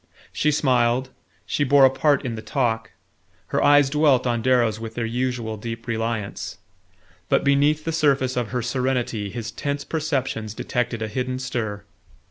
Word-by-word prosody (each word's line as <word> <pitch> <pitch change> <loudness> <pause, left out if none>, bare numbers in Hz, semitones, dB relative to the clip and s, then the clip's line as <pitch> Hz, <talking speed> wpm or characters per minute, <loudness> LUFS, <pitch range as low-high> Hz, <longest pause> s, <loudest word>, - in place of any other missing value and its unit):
She 150 - +1
smiled, 130 -3 +2 0.3
she 145 - 0
bore 140 0 +6
a 130 - +5
part 145 0 +2
in 120 - -2
the 110 - -6
talk, 115 -4 -1 0.6
her - - +1
eyes 145 -1 +6
dwelt 140 -3 +3
on 120 -2 0
Darrow's 120 -3 +2
with 115 0 -7
their 120 - -1
usual 120 -2 -2
deep 115 +2 -6
reliance; 115 -3 -3 0.7
but - - +3
beneath 145 +2 +3
the 165 - -2
surface 140 -5 +2
of 120 -2 -1
her 125 +1 -3
serenity 125 -4 -1
his 115 +2 -5
tense 140 +5 -3
perceptions 135 -9 -2
detected 120 -3 -2
a - - -2
hidden 130 +3 -3
stir. 110 -5 -3
125 Hz, 160 wpm, -23 LUFS, 115-140 Hz, 0.7 s, bore